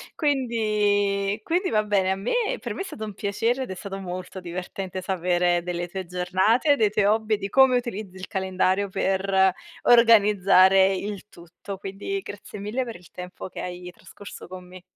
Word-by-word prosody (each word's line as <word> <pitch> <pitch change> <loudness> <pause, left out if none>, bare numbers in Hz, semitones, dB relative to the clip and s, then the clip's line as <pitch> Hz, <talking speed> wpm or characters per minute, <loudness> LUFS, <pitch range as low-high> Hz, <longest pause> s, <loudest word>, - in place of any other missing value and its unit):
Quindi 210 - +1
quindi 360 - 0
va 215 -1 +2
bene 200 -3 +1
a - - +1
me 195 +4 -3 0.3
per - - -5
me, - - -5
è - - -1
stato 225 - -8
un 210 - -7
piacere, 225 +6 -1
ed 255 - -7
è - - -5
stato 195 +1 -7
molto 185 0 -6
divertente 185 +1 -6
sapere 175 -1 +1
delle 175 0 -4
tue 190 +1 -6
giornate, 190 - +2
dei 220 -6 +2
tuoi 205 0 +1
hobby 215 +1 +2
e - - -6
di 195 0 -5
come 265 0 +5
utilizzi 215 -6 -5
il 185 0 -8
calendario 190 0 0
per 190 0 +2 0.3
organizzare 195 -5 +5
il 200 +1 -5
tutto, 175 +3 -10
quindi 195 - -4
grazie 205 - -9
mille 210 +6 -2
per 235 -2 -7
il 175 -1 -15
tempo 180 +1 -8
che - - -8
hai 180 0 -7
trascorso 200 +2 -12
con 180 0 -10
me. 185 0 -12
195 Hz, 180 wpm, -24 LUFS, 185-215 Hz, 0.3 s, come